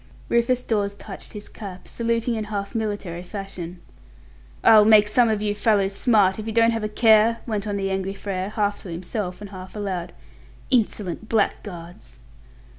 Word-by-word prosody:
Rufus 235 +1 +2
Dawes 200 -3 -1
touched 200 -1 -9
his 210 -1 -7
cap, 190 -4 -9
saluting 230 0 -1
in 220 -2 -2
half 200 -1 -4
military 205 -6 -3
fashion. 180 -2 -7 0.8
"I'll 215 -1 +8
make 210 -1 +6
some 230 +2 +4
of 215 -1 0
you 205 -1 0
fellows 205 -2 +2
smart, 205 -3 +3
if 215 - -6
you - - -2
don't 230 +1 +4
have 225 -1 -2
a 215 - -1
care," 220 +1 +5
went 215 -3 -2
on 205 - -2
the 195 -1 -1
angry 190 0 -2
Frere, 195 -1 -3
half 205 -1 -1
to 190 - -9
himself. 180 +3 -4 1.3
"Insolent 215 -4 0
blackguards!" 180 -5 -2
210 Hz, 155 wpm, -23 LUFS, 195-220 Hz, 1.3 s, I'll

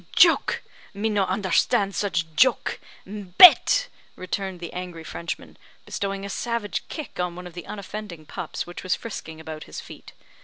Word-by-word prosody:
"Joke! - - +5 0.3
me 215 +2 0
no 205 -2 +2
understand 195 +1 +2
such 185 -5 0
joke. 255 +4 +3 0.3
Bete!" 210 - +7 0.3
returned 185 0 -4
the 170 -1 -7
angry 180 -2 -6
Frenchman, 170 +1 -6 0.3
bestowing 195 0 -3
a - - -5
savage 235 -2 -2
kick 310 - -7
on 180 -1 -1
one 180 0 -8
of 180 - -9
the 175 0 -8
unoffending 200 -5 -7
pups - - -5
which 175 - -8
was 185 - +1
frisking 160 -8 -7
about 155 -1 -7
his - - -7
feet. - - -12
190 Hz, 155 wpm, -25 LUFS, 175-205 Hz, 0.3 s, Bete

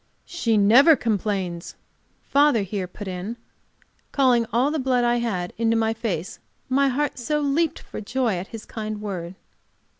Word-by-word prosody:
"She 230 -11 0
never 245 +11 +7
complains," 195 -7 -2 0.5
father 285 -6 +3
here 195 -1 -4
put 200 +3 -9
in, 190 +5 -5 0.7
calling 250 -4 +3
all 255 +5 +2
the 315 - -1
blood 255 -2 +1
I 240 0 +2
had 195 -7 -2
into 230 0 +2
my 225 0 +1
face, 220 -7 -4 0.3
my 275 +2 +3
heart 275 +1 -1
so 300 +5 -1
leaped 295 +3 +1
for - - -8
joy 235 -2 -1
at 180 +3 -5
his 225 -2 -9
kind 215 -1 -5
word. 185 -4 -5
230 Hz, 155 wpm, -24 LUFS, 200-260 Hz, 0.7 s, never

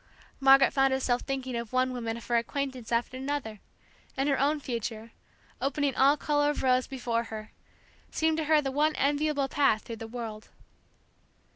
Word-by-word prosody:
Margaret 270 0 +6
found 270 -1 +3
herself 255 -2 0
thinking 265 -2 -4
of 235 -2 -4
one 255 0 +1
woman 230 -2 -3
of 235 - -10
her 240 - +1
acquaintance 260 0 -3
after 235 +2 0
another, 265 -6 -4 0.6
and 270 +1 +1
her 275 -2 +1
own 295 +2 +2
future, 230 -3 -5 0.5
opening 280 0 0
all 280 +3 +4
color 290 0 +1
of 295 - -2
rose 255 -1 +3
before 240 -3 -2
her, 215 -1 -8 0.6
seemed 320 0 0
to 320 - -1
her 305 0 +4
the 270 - -2
one 300 +3 +1
enviable 285 0 +1
path 270 -6 +2
through 230 - -7
the 225 - -7
world. 225 -2 -7
265 Hz, 170 wpm, -28 LUFS, 235-285 Hz, 0.6 s, Margaret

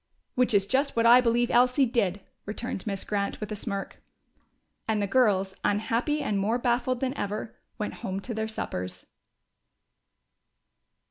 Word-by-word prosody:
"Which 250 -3 +2
is 195 -1 +4
just 275 +6 +1
what 230 0 +2
I 240 +2 +8
believe 240 0 +2
Elsie 250 +3 +4
did!" 205 -6 0 0.3
returned 215 -1 -4
Miss 195 -2 -2
Grant, 200 -1 -2
with 210 0 -5
a - - -2
smirk. 200 -2 -5 0.9
And 220 -1 +1
the 205 - +1
girls, 195 -4 +2
unhappy 230 +8 0
and 205 -2 0
more 215 +5 +1
baffled 245 0 0
than 265 0 -1
ever, 210 0 -4 0.2
went 210 - -3
home 190 0 -3
to 235 - -5
their 220 0 -2
suppers. 90 - -5
220 Hz, 150 wpm, -27 LUFS, 200-245 Hz, 0.9 s, I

